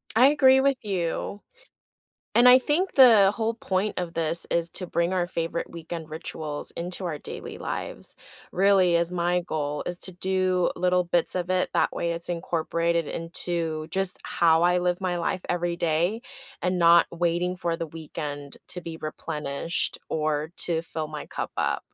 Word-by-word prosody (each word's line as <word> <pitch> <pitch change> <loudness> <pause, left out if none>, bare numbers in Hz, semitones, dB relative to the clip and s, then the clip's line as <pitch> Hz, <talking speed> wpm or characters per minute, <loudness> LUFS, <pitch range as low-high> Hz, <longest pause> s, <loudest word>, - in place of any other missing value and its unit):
I 250 +3 +7
agree 265 -2 +5
with 275 0 +2
you, 195 0 -3 1.0
and 245 +1 +7
I 250 +1 +9
think 340 +8 0
the 225 -7 +7
whole 225 0 -1
point 200 -2 -2
of 175 -2 -4
this 165 0 +3
is 170 0 +1
to 180 - +2
bring 170 +1 -1
our 180 -2 0
favorite 170 -1 -3
weekend 165 -1 -8
rituals 155 -2 -5
into 175 +2 -2
our 160 -4 -3
daily - - -8
lives. - - -4 0.4
Really, 190 -2 +3
as 170 0 +1
my 180 0 0
goal 150 -3 -3
is 175 0 -3
to 185 - -1
do 185 0 0
little 180 0 +2
bits 175 0 +2
of 180 0 -3
it, 185 0 +1
that - - +2
way 170 0 -2
it's 170 0 +1
incorporated 170 -1 -1
into 165 -2 -2
just 190 0 +4
how 165 -1 +2
I 180 +1 +3
live 180 0 -1
my 180 -2 -1
life 180 +1 -2
every 175 -1 -1
day 170 +7 0 0.4
and 180 0 0
not 170 0 +6
waiting 175 +1 -1
for 170 -2 -2
the 165 -1 -4
weekend 145 -2 -7
to 180 - -3
be 165 -2 -7
replenished 155 0 -3
or 155 0 -2
to 165 -2 +4
fill 160 -2 -5
my 150 -1 -7
cup - - -5
up. - - 0
175 Hz, 170 wpm, -25 LUFS, 165-185 Hz, 1.0 s, I